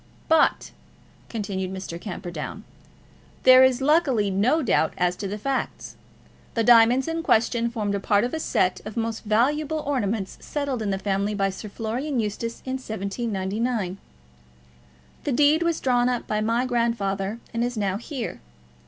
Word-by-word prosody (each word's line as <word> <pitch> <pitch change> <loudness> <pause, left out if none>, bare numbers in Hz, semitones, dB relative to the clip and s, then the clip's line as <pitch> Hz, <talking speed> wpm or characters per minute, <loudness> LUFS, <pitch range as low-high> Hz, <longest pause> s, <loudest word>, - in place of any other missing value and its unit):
"But," 320 -2 +3 0.6
continued 195 -4 -3
Mr. 185 -3 -6
Camperdown, 175 0 -6 0.8
"there 255 0 +8
is 260 0 +3
luckily 270 - +3
no 250 +12 +2
doubt 160 -9 +1
as 180 0 +1
to 200 - -4
the 205 +2 -4
facts. 270 +5 -3 0.6
The 230 - +2
diamonds 240 +4 +6
in 325 0 -2
question 235 -4 +2
formed 215 -4 -2
a 200 - 0
part 205 +1 +2
of 245 - -2
a 320 - -1
set 185 -10 +1
of 215 +2 -8
most 225 -1 -2
valuable 295 +8 +1
ornaments 220 -8 -2
settled 280 -5 -3
in 210 - -1
the 195 - 0
family 200 +1 -1
by 195 -1 +1
Sir 210 +3 -8
Florian 240 +7 -3
Eustace 225 +2 -3
in 260 0 -2
1799. 210 -2 -2 1.2
The 290 - -1
deed 295 +5 +4
was 335 -1 +1
drawn 245 -1 +2
up 245 -2 -2
by 215 0 -1
my 230 +3 +1
grandfather, 225 -4 -1 0.2
and 230 0 0
is 245 -1 -2
now 195 -2 0
here. 245 +1 -5
230 Hz, 155 wpm, -24 LUFS, 200-255 Hz, 1.2 s, there